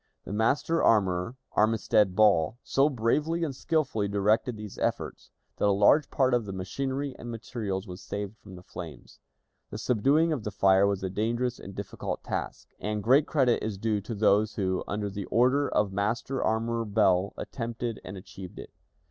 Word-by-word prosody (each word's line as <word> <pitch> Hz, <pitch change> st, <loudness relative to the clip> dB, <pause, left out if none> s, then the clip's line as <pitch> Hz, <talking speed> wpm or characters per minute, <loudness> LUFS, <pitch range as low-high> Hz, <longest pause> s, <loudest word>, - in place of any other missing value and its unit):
The -, -, -6 dB
master 130 Hz, +9 st, +1 dB
armorer, 95 Hz, +2 st, +2 dB
Armistead 105 Hz, -3 st, +2 dB
Ball, 100 Hz, -2 st, +4 dB
so 140 Hz, +2 st, +3 dB
bravely 150 Hz, +7 st, 0 dB
and 145 Hz, -5 st, -2 dB
skillfully 135 Hz, -9 st, 0 dB
directed 105 Hz, +4 st, +1 dB
these 105 Hz, -2 st, -8 dB
efforts, -, -, -3 dB, 0.3 s
that -, -, +2 dB
a -, -, +4 dB
large 105 Hz, +10 st, +4 dB
part 130 Hz, -2 st, +2 dB
of 120 Hz, -3 st, +2 dB
the 100 Hz, -, -5 dB
machinery 135 Hz, +9 st, -3 dB
and 120 Hz, -, -7 dB
materials 110 Hz, -4 st, -4 dB
was 90 Hz, -1 st, -9 dB
saved 100 Hz, +2 st, -5 dB
from 95 Hz, -2 st, -12 dB
the 90 Hz, -, -12 dB
flames. 80 Hz, -8 st, -10 dB, 0.5 s
The -, -, -6 dB
subduing 135 Hz, +9 st, +2 dB
of 130 Hz, -8 st, -3 dB
the 105 Hz, -, -2 dB
fire 95 Hz, -1 st, +4 dB
was 100 Hz, -1 st, -1 dB
a 95 Hz, -, -1 dB
dangerous 120 Hz, +4 st, -1 dB
and 95 Hz, 0 st, -10 dB
difficult 100 Hz, -, -5 dB
task, -, -, -4 dB
and 105 Hz, -1 st, -3 dB
great 135 Hz, +6 st, +4 dB
credit 130 Hz, -6 st, +2 dB
is 105 Hz, -2 st, -3 dB
due 105 Hz, 0 st, 0 dB
to 110 Hz, +3 st, -6 dB
those 105 Hz, +1 st, +3 dB
who, 95 Hz, -2 st, -1 dB
under 105 Hz, 0 st, -2 dB
the 100 Hz, -1 st, -5 dB
orders 130 Hz, +5 st, +2 dB
of 100 Hz, -2 st, +2 dB
Master 115 Hz, +6 st, -1 dB
Armorer 115 Hz, +1 st, 0 dB
Ball, 95 Hz, -2 st, +2 dB
attempted 115 Hz, -2 st, -4 dB
and 95 Hz, +1 st, -8 dB
achieved 95 Hz, -1 st, -10 dB
it. -, -, -9 dB
110 Hz, 175 wpm, -28 LUFS, 100-125 Hz, 0.5 s, Ball